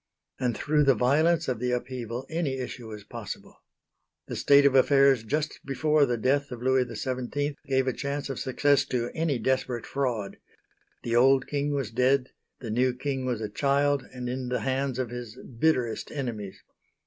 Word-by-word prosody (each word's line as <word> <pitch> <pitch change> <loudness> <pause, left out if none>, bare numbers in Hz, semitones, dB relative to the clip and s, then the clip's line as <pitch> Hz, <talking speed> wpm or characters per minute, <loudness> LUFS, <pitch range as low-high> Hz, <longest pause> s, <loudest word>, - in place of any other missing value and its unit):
And 125 -4 0
through 150 0 +2
the 135 -2 +5
violence 155 +8 +2
of 125 -4 -1
the 125 +1 -1
upheaval 125 0 -4
any 160 -5 -2
issue 125 -2 -6
was 105 -2 -8
possible. - - -8 0.6
The - - -6
state 140 0 +5
of 140 - +5
affairs 135 -2 +5
just 150 +7 -2
before 150 +2 +2
the 120 -1 0
death 140 +5 +1
of 125 - -7
Louis 130 0 +3
XVII 130 +5 -3
gave 135 -1 +2
a 130 - 0
chance 140 +2 -3
of 135 - -4
success 140 +1 +2
to 120 -1 -2
any 160 -4 0
desperate 125 0 -1
fraud. 120 -8 -2 0.7
The 115 - -1
old 130 +2 +5
King 145 0 -1
was 135 -6 -2
dead, 130 +2 +2 0.3
the 115 -4 -5
new 125 +2 +2
King 135 0 -3
was 120 -3 -1
a 110 - -2
child 140 +4 +1
and 125 -1 -6
in 125 0 -3
the 125 - -1
hands 135 -1 -1
of 125 -3 -2
his 120 -1 -7
bitterest 125 -2 -1
enemies. 115 -9 -5
130 Hz, 175 wpm, -27 LUFS, 125-140 Hz, 0.7 s, the